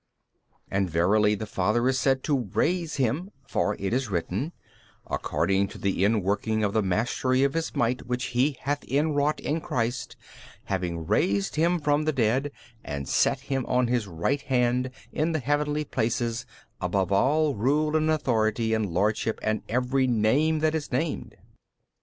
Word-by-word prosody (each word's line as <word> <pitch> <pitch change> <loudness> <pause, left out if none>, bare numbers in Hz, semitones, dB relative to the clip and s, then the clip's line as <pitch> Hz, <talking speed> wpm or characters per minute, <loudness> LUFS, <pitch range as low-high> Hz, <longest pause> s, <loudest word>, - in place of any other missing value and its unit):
B. - - -41 0.2
And 95 -1 +1
verily 105 +6 +3
the 110 - -5
Father 105 +5 +1
is 130 0 +2
said 135 -1 +1
to 130 -8 0
raise 170 -2 +1
Him, 140 - 0 0.2
for 105 -5 0
it 100 +2 -3
is 130 -2 0
written, 95 - -2 0.5
According 100 0 0
to - - -11
the 95 -2 -1
inworking 105 +1 +1
of 100 - -1
the 110 - +3
mastery 120 +7 +1
of 140 0 +2
His 165 0 -2
might 120 +1 0
which 125 0 -1
He 130 +3 +2
hath 145 +1 -2
inwrought 145 +2 +1
65 - - -2
in - - -5
Christ, 125 -7 -2 0.5
having 85 -4 -3
raised 100 +4 +1
Him 170 +3 +2
from 150 0 +1
the 155 - +1
dead 130 +3 +1 0.3
and 70 -2 -5
set - - +2
Him 135 -1 -2
on 125 -1 +2
His 120 -4 0
Right 95 - -1
Hand 125 -1 +1 0.2
in 160 +2 0
the 155 - 0
|306 - - -19
heavenly 150 +2 0
places 115 0 -1 0.3
above 95 +1 0
all 145 +9 +3
rule 150 +8 +1
and 155 0 +2
authority 115 -6 +1
and 110 -3 0
lordship 105 +5 0
and 110 0 0
every 130 +2 +1
name 130 +8 +2
that 155 0 +2
is 155 -2 -3
named. 145 +5 -2
125 Hz, 170 wpm, -26 LUFS, 105-145 Hz, 0.5 s, verily